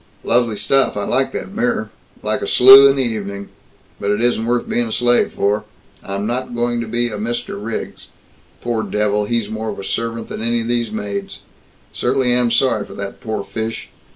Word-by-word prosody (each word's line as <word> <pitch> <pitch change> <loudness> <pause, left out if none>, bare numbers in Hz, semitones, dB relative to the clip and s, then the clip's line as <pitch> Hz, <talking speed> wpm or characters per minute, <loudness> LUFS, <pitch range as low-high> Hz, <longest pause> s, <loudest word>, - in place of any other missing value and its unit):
"Lovely 120 -2 +1
stuff. 130 +4 +2
I 105 - -2
like 130 +5 0
that 195 - -6
mirror. 230 - -1 0.3
Like - - 0
a - - -3
slew 135 +2 +9
in 135 - +2
the 135 - +1
evening. 100 -4 -4 0.5
But 100 - -2
it 105 0 +1
isn't 120 -1 +1
worth 120 0 0
being 120 -1 0
a - - -6
slave 120 +1 +2
for. 100 +1 0 0.4
I'm 100 +1 -4
not 120 +2 -3
going 120 0 0
to 115 - -5
be 120 +2 0
a 105 -2 -5
Mr. 110 -2 -4
Riggs. 115 0 -6 0.5
Poor 120 -2 -1
devil, 105 0 0
he's 115 -1 -1
more 110 +1 -4
of 105 - -5
a - - -7
servant 115 +2 -3
than - - -6
any 115 +1 +1
of 115 - -5
these 120 -2 -1
maids. 100 -2 -5 0.5
Certainly 130 0 +1
am 120 -1 +3
sorry 120 -2 +2
for - - -12
that 100 -1 -7
poor 110 -2 -3
fish. 110 +1 -5
115 Hz, 200 wpm, -18 LUFS, 105-120 Hz, 0.5 s, slew